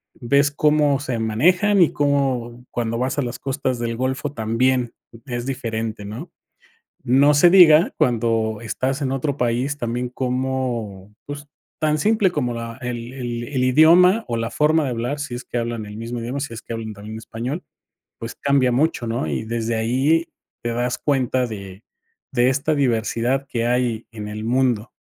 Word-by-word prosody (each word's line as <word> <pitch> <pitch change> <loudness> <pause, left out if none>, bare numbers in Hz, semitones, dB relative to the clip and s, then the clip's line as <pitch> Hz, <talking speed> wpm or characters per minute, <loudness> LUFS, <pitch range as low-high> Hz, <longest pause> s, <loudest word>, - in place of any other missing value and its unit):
ves 140 +3 +2
cómo 150 -1 +2
se 130 -5 -3
manejan 180 - +3
y 165 - +5
cómo 130 -4 0
cuando 115 -1 -2
vas 130 +4 -1
a - - +2
las 120 -1 -4
costas 130 -2 -2
del 115 -1 -2
golfo 130 +3 -2
también 120 +1 0 0.3
es 120 -2 -4
diferente, 115 -5 -3
¿no? 115 - -7 0.8
No 135 +4 +5
se 160 +5 +6
diga 170 -3 +7
cuando 115 -2 +1
estás 130 +5 -2
en 130 - -1
otro 135 +1 -1
país 125 +3 -1
también, 120 +1 -2
como, 125 -6 -3
pues, 145 0 -7 0.3
tan 155 -1 +2
simple 210 0 +3
como 125 -7 -1
la 115 0 -6
el 120 0 -5
el 120 -2 -4
el 130 0 -2
idioma 170 - +6
o 120 - -1
la 115 0 -2
forma 155 +5 +2
de 130 - -1
hablar, 125 +5 -3
si 125 -4 -4
es 120 - -8
que 120 - -4
hablan 115 -2 -3
el 105 0 -9
mismo 115 +2 -5
idioma, 125 +5 -4
si 135 -4 -5
es 115 - -7
que - - -8
hablan 110 -1 -5
también 105 +2 -8
español, 120 +9 -5 0.6
pues, 115 0 -7
cambia 140 -3 +2
mucho, 135 -2 +1
¿no? 115 -8 -1
Y 70 +3 -2
desde 115 0 -2
ahí 135 +9 +2 0.4
te 120 - 0
das 120 +1 -1
cuenta 130 -3 +1
de 100 -2 -8 0.5
de 125 -1 +3
esta 140 +4 0
diversidad 125 +1 0
que 115 -1 -1
hay 120 -2 0
en 105 -2 -7
el 105 +1 -6
mundo. 120 -2 +1
125 Hz, 175 wpm, -21 LUFS, 115-140 Hz, 0.8 s, diga